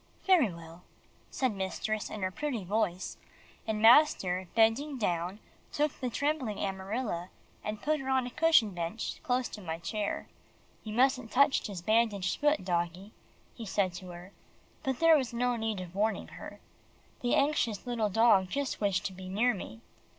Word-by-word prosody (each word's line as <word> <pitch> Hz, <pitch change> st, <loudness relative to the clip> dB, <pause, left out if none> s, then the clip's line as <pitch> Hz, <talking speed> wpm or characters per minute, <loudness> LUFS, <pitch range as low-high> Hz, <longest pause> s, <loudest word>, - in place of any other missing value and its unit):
"Very 340 Hz, -, +4 dB
well," 170 Hz, 0 st, -11 dB, 0.5 s
said 260 Hz, -2 st, 0 dB
mistress 205 Hz, +2 st, -3 dB
in 210 Hz, -, -6 dB
her 185 Hz, -, 0 dB
pretty 255 Hz, -2 st, -3 dB
voice, 190 Hz, -1 st, -1 dB, 0.5 s
and 220 Hz, -1 st, -1 dB
master 215 Hz, -, +5 dB
bending 235 Hz, +6 st, +3 dB
down 180 Hz, -2 st, -1 dB, 0.3 s
took 295 Hz, -1 st, 0 dB
the 255 Hz, -, -2 dB
trembling 265 Hz, -3 st, -1 dB
Amarilla, 190 Hz, -1 st, -3 dB, 0.3 s
and 210 Hz, 0 st, -5 dB
put 305 Hz, 0 st, +1 dB
her 265 Hz, 0 st, -5 dB
on 260 Hz, -1 st, +2 dB
a 245 Hz, -, -6 dB
cushioned 315 Hz, -, +4 dB
bench 175 Hz, +5 st, -4 dB
close 250 Hz, 0 st, 0 dB
to 210 Hz, -, -9 dB
my 165 Hz, -3 st, -4 dB
chair. 200 Hz, +5 st, -3 dB, 0.6 s
"You 215 Hz, -, -6 dB
mustn't 255 Hz, -1 st, +2 dB
touch 280 Hz, +4 st, +3 dB
his 190 Hz, -5 st, -7 dB
bandaged 215 Hz, -3 st, +1 dB
feet, 295 Hz, -8 st, +2 dB
doggie," 175 Hz, +2 st, -2 dB, 0.4 s
he 235 Hz, -, -9 dB
said 190 Hz, -2 st, 0 dB
to 185 Hz, +1 st, -8 dB
her, 175 Hz, +1 st, -10 dB, 0.5 s
but 265 Hz, -2 st, -2 dB
there 330 Hz, -1 st, +7 dB
was 260 Hz, -6 st, 0 dB
no 245 Hz, +1 st, +1 dB
need 220 Hz, -3 st, -2 dB
of 180 Hz, -1 st, -8 dB
warning 215 Hz, +3 st, -1 dB
her. -, -, -10 dB, 0.6 s
The 245 Hz, -, +2 dB
anxious 275 Hz, -8 st, +1 dB
little 235 Hz, -4 st, 0 dB
dog 200 Hz, -3 st, +4 dB
just 280 Hz, 0 st, -3 dB
wished 200 Hz, -2 st, +1 dB
to 190 Hz, -, -3 dB
be 185 Hz, 0 st, -9 dB
near 225 Hz, +6 st, +2 dB
me. 115 Hz, -, -8 dB
215 Hz, 165 wpm, -30 LUFS, 185-255 Hz, 0.6 s, there